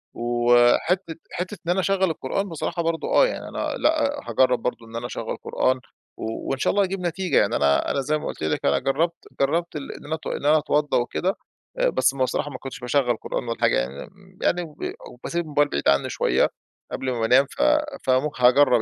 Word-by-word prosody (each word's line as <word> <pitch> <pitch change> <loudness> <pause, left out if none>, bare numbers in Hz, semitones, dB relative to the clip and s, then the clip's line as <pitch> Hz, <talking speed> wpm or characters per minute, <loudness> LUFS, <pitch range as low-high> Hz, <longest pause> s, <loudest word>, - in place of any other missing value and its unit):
وحتّة 120 +9 +3 0.2
حتّة 185 +3 -4
إن 175 - +1
أنا 190 - +1
أشغّل 190 0 +1
القرآن 175 +6 -2
بصراحة 165 +1 -3
برضه 165 0 -1
آه، - - +6
يعني - - -5
أنا - - -3
لأ 290 -2 +1
أ - - -10
هاجرّب 130 -1 +3
برضه 120 -2 -3
إن 115 +1 -12
أنا 120 +1 -4
أشغّل - - -4
قرآن 130 0 0 0.4
و 110 0 -5
وإن 135 - 0
شاء - - +2
الله 200 0 +3
هيجيب 190 0 -2
نتيجة. 180 +1 0
يعني 100 - +3
أنا 70 0 +2
أنا 140 - 0
زي 150 +3 0
ما - - -7
قُلت - - -6
لِك 80 - -1
أنا 70 - +3
جرّبت 165 +5 -1
جرّبت 165 +4 0
ال 145 - -5
إن - - -11
أنا 155 +2 -2
اتو 155 - -6
إن - - -4
أنا 155 +1 +6
اتوضّى 150 0 +1
وكده، 180 +10 -1 0.4
آآ - - +3
بس 135 - +2
ما 130 -1 0
بصراحة 145 +3 -1
ما 130 - -6
كنتش 135 -1 -8
باشغّل 125 -1 +1
قرآن - - -4
ولا 115 -1 -4
حاجة - - +3
يعني 65 +4 -4
م 190 -1 -21
يعني 175 - +2
وب 160 -3 -10 0.3
وباسيب 170 0 -3
الموبايل 145 -1 +1
بعيد 70 - -2
عنّي 70 0 +2
شوية - - +2 0.4
قبل 130 -1 -2
ما 120 - -3
بانام، 125 +5 +4
ف - - -7 0.4
فم 130 +3 +2
هاجرّب 125 -1 +5
145 Hz, 215 wpm, -24 LUFS, 125-175 Hz, 0.4 s, آه